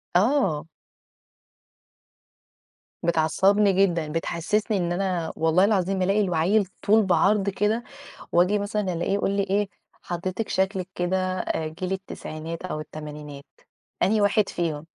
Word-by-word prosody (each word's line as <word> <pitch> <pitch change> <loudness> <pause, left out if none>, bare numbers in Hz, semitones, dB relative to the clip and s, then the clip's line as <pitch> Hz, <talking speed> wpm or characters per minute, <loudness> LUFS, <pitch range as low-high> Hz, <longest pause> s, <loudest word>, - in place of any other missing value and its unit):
آه. 185 - +2 2.4
بتعصّبني 190 +5 +3
جدًا، 175 -5 +2
بتحسِّسني 195 +6 -1
إن 175 -1 -1
أنا 180 -3 -1
والله 160 +4 +3
العظيم 195 -2 +1
ألاقي 195 +3 +2
العيِّل 185 +3 +2 0.2
طول 215 0 +5
بعرض 195 +3 +3
كده 210 +4 0 0.5
وآجي 185 +4 +3
مثلًا 205 -2 -1
ألاقيه 175 +3 -1
يقول 200 -1 +1
لي 200 0 +1
إيه: 200 +1 0 0.3
"حضرتِك 185 +5 -4
شكلِك 190 -1 0
كده 180 +1 0 0.2
آآ 160 -2 -2
جيل 180 +4 -5
التسعينات 165 -3 -6
أو 155 - -4
التمانينات، 150 -2 -8 0.6
أنهي 210 +3 +3
واحد 205 0 +3
فيهم؟" 160 -3 -3
185 Hz, 120 wpm, -25 LUFS, 165-200 Hz, 2.4 s, طول